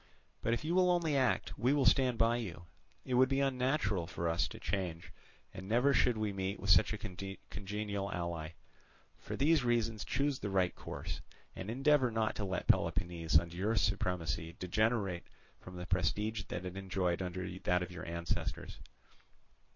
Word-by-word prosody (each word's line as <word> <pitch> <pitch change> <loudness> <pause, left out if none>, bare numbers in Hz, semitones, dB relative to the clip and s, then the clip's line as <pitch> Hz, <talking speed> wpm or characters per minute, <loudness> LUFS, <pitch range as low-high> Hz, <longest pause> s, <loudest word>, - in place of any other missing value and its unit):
But 115 - +1
if 120 - -6
you 165 - 0
will 180 0 +4
only 170 -4 +2
act, 130 -2 +1
we 125 +3 +3
will 145 -3 +2
stand 130 -3 +4
by 115 +1 +3
you; 90 -7 -6 0.4
it 130 - -3
would 130 +1 +5
be 135 0 +1
unnatural 130 - +1
for 85 - -3
us 85 +1 +1
to - - -10
change, 90 -3 -3 0.4
and 95 +1 -8
never 125 +5 +4
should 125 -3 +3
we 105 -2 -1
meet 95 +1 -3
with 100 - +1
such - - +6
a 105 - -2
congenial 100 +1 -5
ally. 85 -2 -3 0.7
For - - -5
these 150 0 +3
reasons 115 -3 +1
choose 140 -1 0
the 100 - -3
right 95 -2 +2
course, - - -6 0.3
and 95 - -6
endeavour 135 +2 +3
not 110 -1 0
to 105 - -2
let 95 -1 -2
Peloponnese 85 -1 +2
under 85 +2 0
your 105 +5 0
supremacy 90 -5 -1
degenerate 100 -1 0 0.3
from 90 - -11
the 90 0 -5
prestige 100 +4 0
that 90 +1 -5
it 90 0 -5
enjoyed 95 -2 -1
under 90 0 -3
that 90 0 +1
of 90 - -7
your 85 -2 -7
ancestors." 85 0 -3
100 Hz, 175 wpm, -34 LUFS, 90-120 Hz, 0.7 s, such